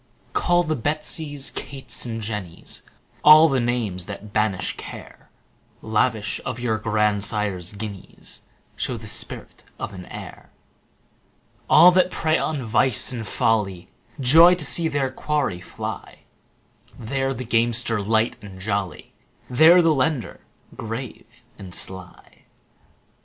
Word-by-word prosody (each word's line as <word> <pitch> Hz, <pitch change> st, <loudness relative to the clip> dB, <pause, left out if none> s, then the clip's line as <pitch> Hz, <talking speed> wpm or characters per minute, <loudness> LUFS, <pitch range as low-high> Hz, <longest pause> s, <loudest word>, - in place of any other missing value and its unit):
Call 175 Hz, 0 st, +2 dB
the 155 Hz, -2 st, -1 dB
Betsies, 145 Hz, +1 st, -2 dB
Kates, 130 Hz, -3 st, -2 dB
and 115 Hz, -1 st, -5 dB
Jennies, 105 Hz, -6 st, -5 dB, 0.4 s
All 155 Hz, +2 st, +9 dB
the 135 Hz, -4 st, +1 dB
names 115 Hz, -7 st, -2 dB
that 105 Hz, +1 st, -9 dB
banish 105 Hz, -4 st, 0 dB
care; -, -, -11 dB, 0.5 s
10 110 Hz, -, -8 dB
Lavish 110 Hz, -1 st, 0 dB
of 125 Hz, -1 st, -4 dB
your 115 Hz, -3 st, -1 dB
grandsire's 105 Hz, -3 st, 0 dB
guineas, 100 Hz, -2 st, -8 dB, 0.3 s
Show -, -, -3 dB
the -, -, -10 dB
spirit -, -, -2 dB, 0.2 s
of -, -, -6 dB
an 90 Hz, -1 st, -10 dB
heir. -, -, -10 dB, 1.2 s
All 175 Hz, +3 st, +8 dB
that 185 Hz, 0 st, +3 dB
prey 160 Hz, -3 st, 0 dB
on 145 Hz, -6 st, -2 dB
vice 120 Hz, +3 st, +2 dB
and 115 Hz, -4 st, -5 dB
folly 105 Hz, -7 st, 0 dB, 0.3 s
Joy 165 Hz, +7 st, +7 dB
to 170 Hz, -4 st, -3 dB
see 165 Hz, +4 st, +2 dB
their 140 Hz, -4 st, -1 dB
quarry 140 Hz, -10 st, -2 dB
fly: 85 Hz, -, -7 dB, 0.8 s
There 135 Hz, +3 st, -2 dB
the 125 Hz, -1 st, -5 dB
gamester, 115 Hz, -1 st, +1 dB
light 110 Hz, +3 st, +1 dB
and 95 Hz, -2 st, -11 dB
jolly, 100 Hz, -4 st, -4 dB, 0.4 s
15 125 Hz, -, -7 dB
There 170 Hz, +4 st, +8 dB
the 165 Hz, -1 st, +4 dB
lender, 135 Hz, -2 st, -1 dB, 0.4 s
grave 120 Hz, +1 st, -8 dB, 0.2 s
and 95 Hz, -3 st, -4 dB
sly. 95 Hz, -1 st, -8 dB
115 Hz, 130 wpm, -23 LUFS, 105-140 Hz, 1.2 s, All